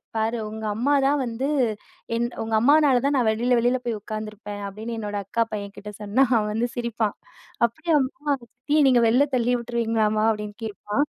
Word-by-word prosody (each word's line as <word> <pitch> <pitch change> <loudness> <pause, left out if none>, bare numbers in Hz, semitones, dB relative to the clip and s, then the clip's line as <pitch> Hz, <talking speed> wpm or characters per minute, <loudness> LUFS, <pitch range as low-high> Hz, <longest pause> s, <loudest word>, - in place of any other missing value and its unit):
பாரு 220 +2 0
உங்க 220 0 -6
அம்மா 245 +7 +1
தான் 285 +2 +3
வந்து, 245 +2 -2 0.7
"என் 235 +1 +1
உங்க 225 0 -3
அம்மானால 285 +1 +5
தான் 280 - +2
நான் 250 -4 +2
வெளியில 240 +3 +2
வெளியில 245 +2 +2
போய் 235 -2 -1
உட்காந்துருப்பேன்" 215 -1 -6
அப்படின்னு 220 +4 -6
என்னோட 205 -1 -4
அக்கா 230 +4 -1
பையன்கிட்ட 205 0 -6
சொன்னா 210 +6 +3
அவன் 210 -2 +1
வந்து 230 +3 0
சிரிப்பான். 235 -3 -1 0.5
"அப்படியாம்மா 295 +2 0
சித்திய 285 +6 0
நீங்க 250 -2 +5
வெளில 255 +6 +4
தள்ளி 245 0 +2
விட்டுருவீங்களாம்மா?" 225 -2 0
அப்படின்னு 210 -1 -3
கேட்பான். 210 +5 -1
230 Hz, 160 wpm, -24 LUFS, 215-250 Hz, 0.7 s, அம்மானால